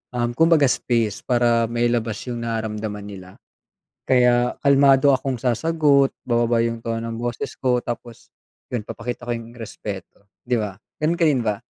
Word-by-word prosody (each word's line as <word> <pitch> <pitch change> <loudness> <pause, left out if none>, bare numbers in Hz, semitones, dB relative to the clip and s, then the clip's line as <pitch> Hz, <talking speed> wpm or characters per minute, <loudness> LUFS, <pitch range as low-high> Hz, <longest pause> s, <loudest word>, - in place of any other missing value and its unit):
um, 120 0 0
kumbaga 165 -2 +5
space 115 -4 0
para 120 -2 +2
mailabas 120 -2 0
yung 120 -1 -4
nararamdaman 110 -2 -4
nila. 95 -2 -11 0.7
Kaya 125 -1 +3
kalmado 140 0 +5
akong 130 0 -1
sasagot, 140 +2 +2
bababa 120 -1 +2
yung 115 0 -2
tono 115 0 -3
ng 115 - -5
boses 120 0 -4
ko, 125 -2 +2
tapos 120 -1 -7 0.4
yun, 120 - -1
ipapakita 120 +1 -6
ko - - -1
yung 115 0 -9
respeto. 100 -2 -8 0.2
Di 125 0 0
ba, 105 -3 -3 0.3
ganun 165 +3 +1
ka 170 - +4
din 130 -5 +2
ba? 105 -1 0
120 Hz, 155 wpm, -22 LUFS, 115-130 Hz, 0.7 s, kumbaga